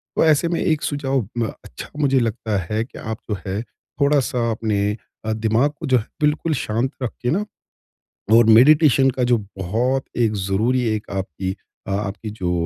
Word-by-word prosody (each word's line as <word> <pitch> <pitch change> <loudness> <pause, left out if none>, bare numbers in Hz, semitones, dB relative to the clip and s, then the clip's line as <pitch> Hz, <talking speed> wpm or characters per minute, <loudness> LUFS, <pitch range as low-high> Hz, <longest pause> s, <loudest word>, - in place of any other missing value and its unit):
तो - - +3
ऐसे 155 +1 +4
में 170 0 -1
एक 155 -3 +1
सुझाव 135 -6 -1
म 115 - +1 0.2
अच्छा - - -9
मुझे 135 -3 +3
लगता 110 -2 -1
है 110 +1 0
कि - - -14
आप 110 -1 -4
जो 105 - -1
है 95 +3 -2 0.4
थोड़ा-सा 135 -4 +2
अपने 105 -2 0 0.3
अ, 110 - 0
दिमाग 110 +6 +1
को 165 - -5
जो 130 -1 +4
है 110 - -3 0.2
बिल्कुल 150 +2 +1
शांत 120 -1 -1
रख 120 - -1
के 125 - 0
न 200 +6 0 0.9
और 115 0 +7
मेडिटेशन 135 +4 +6
का 130 0 -2
जो 120 - +5 0.2
बहुत 120 +8 0
एक 115 -3 +2
ज़रूरी 105 +6 +1
एक 105 - -6
आपकी 95 -1 -3 0.4
अ - - -3
आपकी 105 +2 -3
जो 90 -3 -1
115 Hz, 180 wpm, -21 LUFS, 105-135 Hz, 0.9 s, और